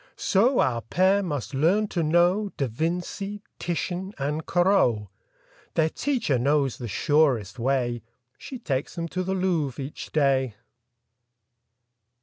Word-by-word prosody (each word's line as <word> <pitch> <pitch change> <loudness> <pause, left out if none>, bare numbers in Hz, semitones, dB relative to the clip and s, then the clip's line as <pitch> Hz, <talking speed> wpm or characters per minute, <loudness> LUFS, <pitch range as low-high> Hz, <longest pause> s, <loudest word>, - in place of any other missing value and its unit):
So 240 +7 +3
our 120 -5 +1
pair 190 - +2
must 145 - -4
learn 175 +10 +2
to 175 - -1
know 175 +6 +3
Da 140 - +1
Vinci, 180 - -3 0.2
Titian 180 +3 -3
and 150 +3 -2
Corot. 175 - +2 0.7
Their 160 -1 +3
teacher 235 - 0
knows 140 0 +1
the 120 - -5
surest 130 - +1
way: 120 -2 0 0.3
She 265 - -8
takes 145 - -3
them 170 -1 -3
to 185 - -2
the 190 +1 -1
Louvre 170 -8 0
each 140 - -8
day. 135 -6 +2
160 Hz, 130 wpm, -25 LUFS, 135-185 Hz, 0.7 s, So